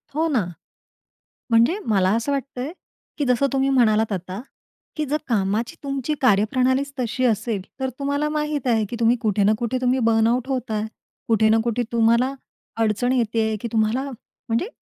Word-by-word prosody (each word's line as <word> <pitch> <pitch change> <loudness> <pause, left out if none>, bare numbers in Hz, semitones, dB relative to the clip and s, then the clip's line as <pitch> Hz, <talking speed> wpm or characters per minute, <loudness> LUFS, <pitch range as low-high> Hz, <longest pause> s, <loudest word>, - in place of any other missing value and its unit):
हो 320 +2 +2
ना. 265 -10 +1 1.1
म्हणजे 235 - +4
मला 195 -4 +2
असं 230 +5 -1
वाटतय, 275 0 -3 0.5
की 290 - 0
जसं 250 +2 +2
तुम्ही 270 0 +2
म्हणालात 220 -5 +3
आता 185 +2 -5 0.5
की 310 - -1
जर 295 +2 0
कामाची 215 0 0
तुमची 275 +1 -2
कार्यप्रणालीच 255 +5 +2
तशी 250 +2 -1
असेल, 220 -3 0 0.2
तर 265 0 -1
तुम्हाला 285 +2 0
माहित 300 -2 -2
आहे 225 -3 +2
की 240 - -4
तुम्ही 235 +1 +4
कुठे 210 -2 +1
ना 210 +2 +4
कुठे 240 +2 -1
तुम्ही 255 +1 +2
बर्नआउट 230 +2 +2
होताय. 225 -5 -2 0.4
कुठे 220 -1 +3
ना 225 - +5
कुठे 240 +1 0
तुम्हाला 235 +3 +3 0.5
अडचण 225 +3 +1
येतीय, 225 -3 +1
की 235 - -3
तुम्हाला 230 +5 +1
म्हणजे 235 - -4
240 Hz, 160 wpm, -22 LUFS, 220-265 Hz, 1.1 s, ना